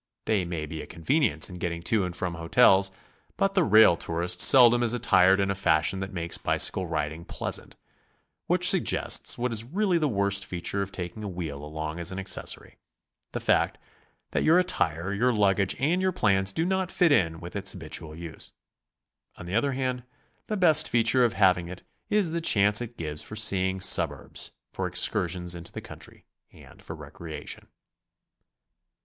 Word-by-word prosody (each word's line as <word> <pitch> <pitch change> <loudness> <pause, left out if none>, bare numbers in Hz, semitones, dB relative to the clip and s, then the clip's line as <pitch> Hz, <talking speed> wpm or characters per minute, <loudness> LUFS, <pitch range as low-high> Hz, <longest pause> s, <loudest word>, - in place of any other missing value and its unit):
They 105 -5 0
may 85 -3 -4
be 80 +1 -7
a - - -10
convenience 95 - +1
in 90 -1 -10
getting 85 -1 -4
to 105 +1 +1
and 90 -1 -6
from 90 -2 -3
hotels, 95 +3 +4 0.5
but 195 0 +1
the 190 -3 +3
rail 110 - +6
tourist 85 +2 -2
seldom 120 -2 +7
is 120 0 0
aitired 95 -5 +4
in 100 -1 0
a - - 0
fashion 90 -1 0
that 95 0 -5
makes 85 -2 -6
bicycle 95 -1 +1
riding 80 0 -4
pleasant, - - -5 0.7
which - - +2
suggests - - +2
what 125 0 -2
is 110 0 0
really 180 - 0
the 155 - +1
worst 100 -4 0
feature 90 +3 -4
of 100 0 -5
taking 90 +2 -7
a - - -4
wheel 80 -6 -6
along 80 +2 -6
as 85 +1 -4
an 95 - -6
accessory, 95 0 -5 0.3
— - - -40
the - - -3
fact - - +1 0.5
that - - -1
your 160 +3 +4
at 180 0 +1
tire, 85 - -1
your 120 +5 +1
luggage 100 -3 +1
and 165 +7 0
your 185 0 +1
plans 95 - +1
do 160 +11 -2
not 190 0 -1
fit 175 -3 +2
in 85 - +2
with 85 +3 -10
its 100 -2 -1
habitual 80 -2 -7
use. 85 -1 -9 0.8
On 90 - -11
the 90 - -7
other 130 +6 +1
hand, 130 -1 -2 0.5
the 215 - -2
best 160 -4 +5
feature 120 +2 +3
of 120 -4 +1
having 90 -2 +2
it 90 +1 -10 0.3
is 205 -6 +1
the 170 0 -2
chance 105 -6 +4
it 120 0 -8
gives 75 -2 -5
for 110 - -9
seeing 95 -3 +1
suburbs, 90 - 0 0.2
for 95 - -3
excursions 90 -1 0
into 85 -1 -10
the - - -7
country - - -12 0.3
and - - -17
for - - -8
recreation. 80 -3 -9
95 Hz, 180 wpm, -26 LUFS, 85-120 Hz, 0.8 s, seldom